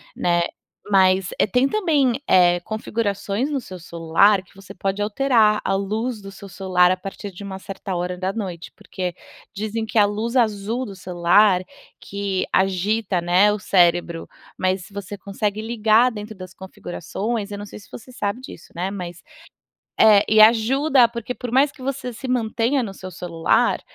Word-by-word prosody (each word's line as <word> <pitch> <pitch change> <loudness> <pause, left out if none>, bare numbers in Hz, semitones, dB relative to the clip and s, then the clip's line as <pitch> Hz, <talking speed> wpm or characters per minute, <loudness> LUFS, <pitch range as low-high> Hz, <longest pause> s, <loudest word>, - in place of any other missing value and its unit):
né. 175 -1 +1 0.5
Mas 190 -1 +3
é, - - +5
tem 250 +7 +2
também, 295 - +1
eh, 175 -1 +5
configurações 215 +3 -2
no 275 -2 -1
seu 185 -5 -9
celular 170 +4 +2
que 180 - -25
você 195 0 -12
pode 195 +1 -3
alterar 215 -1 +2
a - - 0
luz 215 +4 -2
do 195 0 -9
seu 195 0 -12
celular 180 -1 +2
a 185 - 0
partir 195 +1 -8
de 185 +2 -11
uma 190 -1 -7
certa 195 -1 -6
hora 180 +1 -3
da 185 +1 -2
noite, 185 -6 -6
porque 180 -2 -5 0.4
dizem 215 +2 -3
que 220 - -4
a 205 - +6
luz 215 +4 -3
azul 225 0 0
do 200 - -9
celular 180 +2 +3 0.4
que 200 -1 -3
agita, 195 +1 +1
né, 180 +4 +4
o 210 - -4
cérebro. 175 -3 +2 0.3
Mas 185 0 0
se - - -17
você 200 0 -6
consegue 205 +1 -3
ligar 225 +2 +3
dentro 215 -1 -8
das 185 -1 -10
configurações, 200 +4 -5
eu 205 - -5
não 205 - -6
sei - - -10
se 200 - -17
você 250 +2 -11
sabe 225 -1 -3
disso, 255 - -12
né. 180 +3 -2
Mas 175 -3 -7 0.8
é, 210 -2 +7
e 215 0 +5
ajuda, 240 +4 +5
porque 235 +1 -5
por 250 -1 -6
mais 275 +4 +3
que 280 - -15
você 255 -2 -4
se 255 +3 -8
mantenha 245 +2 0
no 195 -3 -7
seu 185 -1 -9
celular, 170 -2 0
200 Hz, 175 wpm, -22 LUFS, 185-225 Hz, 0.8 s, é